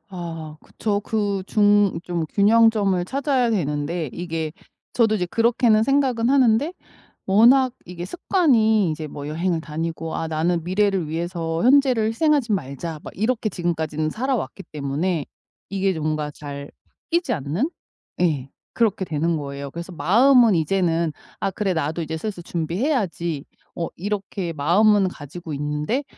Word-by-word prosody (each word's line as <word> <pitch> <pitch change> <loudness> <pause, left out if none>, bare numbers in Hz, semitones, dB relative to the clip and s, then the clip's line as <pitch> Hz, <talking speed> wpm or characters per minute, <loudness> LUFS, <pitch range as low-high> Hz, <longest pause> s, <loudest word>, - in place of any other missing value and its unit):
아 165 -4 -7
그쵸. 205 -2 -2
그 205 -2 -1
중 205 -3 +3
좀 170 -2 -2
균형점을 205 -3 +4
찾아야 265 +1 0
되는데 150 - -1
이게 165 -3 -4 0.4
저도 225 -3 +3
이제 180 -3 -1
그렇게는 230 +1 +3
생각은 255 -2 +2
하는데 265 +3 +3 0.5
워낙 245 +6 +5
이게 175 0 -7
습관이 220 - +2
이제 155 0 -4
뭐 145 0 -7
여행을 165 +1 -1
다니고 160 +1 -4
'아 165 - -2
나는 160 +1 0
미래를 190 -2 +1
위해서 165 0 -2
현재를 255 -4 +4
희생하진 270 -1 +2
말자.' 155 +2 -6
막 - - -8
이렇게 220 +2 0
지금까지는 160 -4 -2
살아왔기 245 - -2
때문에 150 +3 -2 0.4
이게 195 -3 0
뭔가 155 -1 -2
잘 140 -1 -8 0.4
바뀌지 340 -6 +1
않는? 180 - -1 0.5
예. 145 -7 0 0.2
그렇게 215 -4 +1
되는 165 0 0
거예요. 140 -1 -5
그래서 170 +2 -7
마음은 230 - +5
이제는 165 -1 +1 0.3
아 - - 0
그래 195 0 -1
나도 160 +1 -1
이제 160 +1 -4
슬슬 190 +1 -5
준비해야지 170 - -1 0.3
어 165 - -3
이렇게 195 -2 -3
마음은 195 +7 +3
가지고 160 0 -8
있는데 150 - -2
180 Hz, 315 characters per minute, -22 LUFS, 160-220 Hz, 0.5 s, 워낙